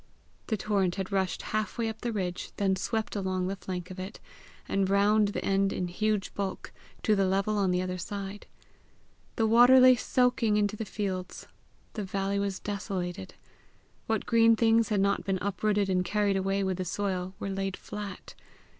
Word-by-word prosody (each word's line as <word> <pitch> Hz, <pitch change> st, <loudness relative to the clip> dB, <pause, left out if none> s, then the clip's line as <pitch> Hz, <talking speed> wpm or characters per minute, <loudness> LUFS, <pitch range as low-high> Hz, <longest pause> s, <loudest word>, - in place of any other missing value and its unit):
The 220 Hz, -, 0 dB
torrent 195 Hz, -3 st, 0 dB
had 190 Hz, 0 st, -4 dB
rushed 190 Hz, -2 st, -1 dB
half 215 Hz, +2 st, -1 dB
way 230 Hz, -1 st, 0 dB
up 220 Hz, 0 st, -5 dB
the 240 Hz, -, -2 dB
ridge, 180 Hz, -4 st, -3 dB
then 195 Hz, -2 st, +2 dB
swept 220 Hz, +2 st, -2 dB
along 185 Hz, -2 st, -1 dB
the 195 Hz, +2 st, -2 dB
flank 180 Hz, -1 st, -6 dB
of 185 Hz, -, -8 dB
it, 190 Hz, +3 st, -7 dB, 0.5 s
and 195 Hz, -1 st, +1 dB
round 205 Hz, +2 st, +4 dB
the 200 Hz, -, -3 dB
end 195 Hz, 0 st, +2 dB
in 180 Hz, -1 st, -2 dB
huge 210 Hz, +2 st, -1 dB
bulk, 195 Hz, -2 st, -4 dB, 0.3 s
to 215 Hz, -, +3 dB
the 195 Hz, -1 st, +2 dB
level 195 Hz, +3 st, +1 dB
on 195 Hz, -2 st, +2 dB
the 180 Hz, 0 st, +1 dB
other 185 Hz, 0 st, -4 dB
side. 200 Hz, +2 st, -6 dB, 0.9 s
The 225 Hz, -, +2 dB
water 245 Hz, +4 st, +7 dB
lay 255 Hz, 0 st, +8 dB
soaking 245 Hz, -3 st, +2 dB
into 205 Hz, 0 st, +1 dB
the 220 Hz, -, -4 dB
fields. 190 Hz, -3 st, -4 dB, 0.5 s
The 215 Hz, -, -4 dB
valley 195 Hz, +1 st, -1 dB
was 200 Hz, -1 st, -1 dB
desolated. 195 Hz, -2 st, -4 dB, 0.7 s
What 220 Hz, -1 st, 0 dB
green 230 Hz, -1 st, +5 dB
things 225 Hz, -1 st, +3 dB
had 205 Hz, -3 st, +2 dB
not 200 Hz, 0 st, +1 dB
been 195 Hz, -1 st, 0 dB
uprooted 200 Hz, +1 st, 0 dB
or 185 Hz, -1 st, +2 dB
carried 205 Hz, +2 st, +1 dB
away 195 Hz, +1 st, 0 dB
with 190 Hz, -1 st, -1 dB
the 185 Hz, -, -3 dB
soil, 185 Hz, -1 st, -2 dB
were 195 Hz, -, -3 dB
laid 195 Hz, 0 st, -3 dB
flat. 205 Hz, -2 st, -8 dB
200 Hz, 180 wpm, -29 LUFS, 190-215 Hz, 0.9 s, lay